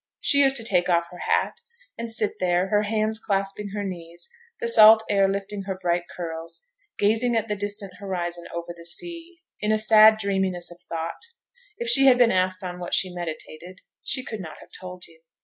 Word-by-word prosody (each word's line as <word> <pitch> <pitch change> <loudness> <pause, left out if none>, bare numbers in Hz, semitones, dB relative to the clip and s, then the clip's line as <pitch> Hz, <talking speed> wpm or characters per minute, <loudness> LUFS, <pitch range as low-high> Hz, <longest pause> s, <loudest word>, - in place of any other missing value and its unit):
She 280 - +3
used 270 -1 +5
to 230 - -3
take 180 -5 +2
off 170 -1 +2
her 180 - -11
hat, - - +1 0.4
and 230 0 -6
sit 215 -2 0
there, 180 +1 +1
her 210 +1 +3
hands 215 +1 -1
clasping 200 0 -2
her 205 +1 -4
knees, 175 -2 -6 0.3
the 470 - -2
salt 220 - +8
air 195 -1 +4
lifting 195 0 -4
her 190 -1 -3
bright 175 -1 0
curls, 165 - -7 0.3
gazing 225 +4 +2
at 225 -1 0
the 210 - -2
distant 205 -1 -5
horizon 175 -3 -4
over 170 0 -6
the 170 - -13
sea, 335 - -6 0.2
in 210 - 0
a 215 - +3
sad 215 0 +6
dreaminess 190 -4 -1
of 175 - -14
thought; 165 0 -4 0.6
if 475 - -4
she 275 - +5
had 255 -2 +7
been 245 -2 +5
asked 185 +1 0
on 180 -1 -6
what 175 - -2
she 185 -2 0
meditated, 175 +1 -7 0.2
she 260 -1 -2
could 220 - -6
not 160 -5 -8
have - - -16
told 180 -1 -9
you. 160 -1 -20
195 Hz, 200 wpm, -24 LUFS, 175-220 Hz, 0.6 s, salt